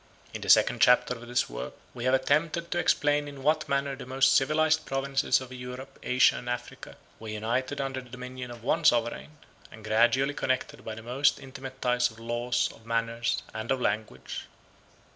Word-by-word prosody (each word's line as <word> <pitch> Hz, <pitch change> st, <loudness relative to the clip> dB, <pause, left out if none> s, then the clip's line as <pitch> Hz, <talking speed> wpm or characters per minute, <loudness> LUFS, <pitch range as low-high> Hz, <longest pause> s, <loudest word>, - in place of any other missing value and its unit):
In -, -, -6 dB
the -, -, -5 dB
second -, -, +5 dB
chapter 125 Hz, 0 st, +5 dB
of 120 Hz, 0 st, -10 dB
this 120 Hz, 0 st, +1 dB
work -, -, -6 dB, 0.2 s
we 120 Hz, -1 st, -5 dB
have 130 Hz, -, +3 dB
attempted 155 Hz, +5 st, 0 dB
to 175 Hz, -, 0 dB
explain 145 Hz, -3 st, +2 dB
in 140 Hz, -2 st, -9 dB
what 155 Hz, +1 st, +1 dB
manner 140 Hz, 0 st, 0 dB
the 130 Hz, -, -10 dB
most 130 Hz, +1 st, +3 dB
civilized 155 Hz, +3 st, +3 dB
provinces 135 Hz, 0 st, +1 dB
of 130 Hz, -1 st, -9 dB
Europe, 125 Hz, +2 st, -8 dB
Asia, 130 Hz, +1 st, +4 dB
and 120 Hz, -, -6 dB
Africa 120 Hz, 0 st, -6 dB, 0.2 s
were 110 Hz, -, -9 dB
united 120 Hz, +6 st, -2 dB
under 135 Hz, -1 st, -2 dB
the 125 Hz, -, -16 dB
dominion 125 Hz, 0 st, -7 dB
of 120 Hz, -2 st, -10 dB
one 125 Hz, -, +1 dB
sovereign, 120 Hz, +6 st, +1 dB, 0.3 s
and 110 Hz, -1 st, -12 dB
gradually 120 Hz, +6 st, +3 dB
connected 130 Hz, -2 st, -2 dB
by 110 Hz, -, -6 dB
the 110 Hz, -, -10 dB
most 135 Hz, +4 st, +2 dB
intimate 135 Hz, -1 st, -9 dB
ties 125 Hz, -1 st, +2 dB
of 110 Hz, -, -15 dB
laws, 120 Hz, +1 st, 0 dB
of -, -, -18 dB
manners, 115 Hz, 0 st, -1 dB
and 110 Hz, +1 st, -5 dB
of 135 Hz, -, +1 dB
language. 105 Hz, -, -3 dB
125 Hz, 185 wpm, -28 LUFS, 120-135 Hz, 0.3 s, second